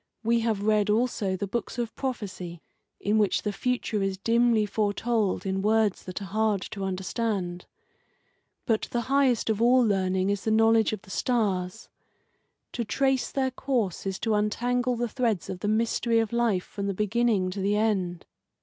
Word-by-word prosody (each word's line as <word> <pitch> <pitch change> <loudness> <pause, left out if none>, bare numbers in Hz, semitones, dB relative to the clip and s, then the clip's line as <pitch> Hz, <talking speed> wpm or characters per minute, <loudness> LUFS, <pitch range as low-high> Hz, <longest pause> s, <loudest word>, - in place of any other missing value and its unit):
We 230 +1 +3
have 225 -3 -1
read 210 -1 +2
also 215 -3 +1
the 200 - -2
books 235 +4 -4
of 235 -2 -3
prophecy 185 -9 -5 0.4
in 210 +2 +1
which 205 -2 +1
the 210 - -1
future 230 -1 -1
is 195 -1 -1
dimly 230 +1 +3
foretold 210 0 0
in 190 0 -1
words 215 -1 +1
that 185 +1 -5
are 195 0 -9
hard 215 -3 +1
to 200 -2 -5
understand. 190 -1 -2 1.0
But 225 -2 0
the 240 - -1
highest 265 -2 +2
of 215 0 -2
all 250 +2 +5
learning 190 -2 +1
is 205 -1 -2
the - - -1
knowledge 225 0 +4
of 215 -2 -5
the 190 - -13
stars. 190 -7 -1 0.8
To 235 - -2
trace 265 +3 0
their 265 -1 0
course 240 -9 -2
is 190 -1 -2
to 225 - +1
untangle 245 +4 0
the 240 +1 -1
threads 225 -6 -1
of 185 - -6
the 205 - -3
mystery 230 +2 +1
of 225 0 0
life 230 -6 +1
from 200 -1 -5
the 200 - -2
beginning 210 -2 +1
to 200 - -5
the 200 +2 +1
end. 190 -5 0
215 Hz, 175 wpm, -27 LUFS, 195-235 Hz, 1.0 s, all